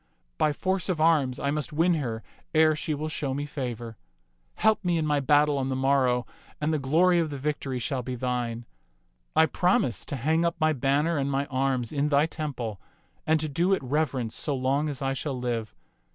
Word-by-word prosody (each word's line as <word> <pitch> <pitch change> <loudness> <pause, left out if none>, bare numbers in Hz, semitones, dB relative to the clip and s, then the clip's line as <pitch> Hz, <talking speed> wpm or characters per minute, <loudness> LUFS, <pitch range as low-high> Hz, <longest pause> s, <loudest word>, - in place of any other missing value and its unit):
By 150 - +3
force 185 +5 -1
of 175 -4 0
arms 155 -6 +3
I 140 - 0
must 150 0 -3
win 165 +4 +3
her 120 -8 -3 0.3
ere 155 0 +5
she 150 0 -2
will 155 +2 -3
show 140 -4 -2
me 145 +1 -2
favor. 120 -6 -5 0.6
Help 220 -1 +2
me 175 -2 +1
in 160 - 0
my 150 -1 +2
battle 145 +1 +3
on 135 0 -1
the 130 - -1
morrow, 130 -2 +2 0.3
and 155 +1 0
the 155 - +1
glory 170 +6 +3
of 165 -2 0
the 145 - -5
vic 150 +2 -2
tory 130 -2 -4
shall 135 0 -2
be 125 +1 -5
thine. 120 -2 -2 0.7
I 160 0 +6
promise 160 -6 +1
to - - -3
hang 160 +6 +1
up 170 0 +1
my 155 0 +3
banner 145 +5 +1
and 140 0 0
my 140 0 0
arms 130 -2 0
in 145 0 +1
thy 145 +1 +4
temple 130 - -5 0.5
and 160 0 +3
to 155 - -1
do 170 +6 +1
it 165 - -7
reverence 130 -4 -1
so 145 - -1
long 135 +4 0
as 140 -2 -5
I 135 0 0
shall 135 0 -3
live. 120 -3 -3
145 Hz, 210 wpm, -27 LUFS, 130-155 Hz, 0.7 s, I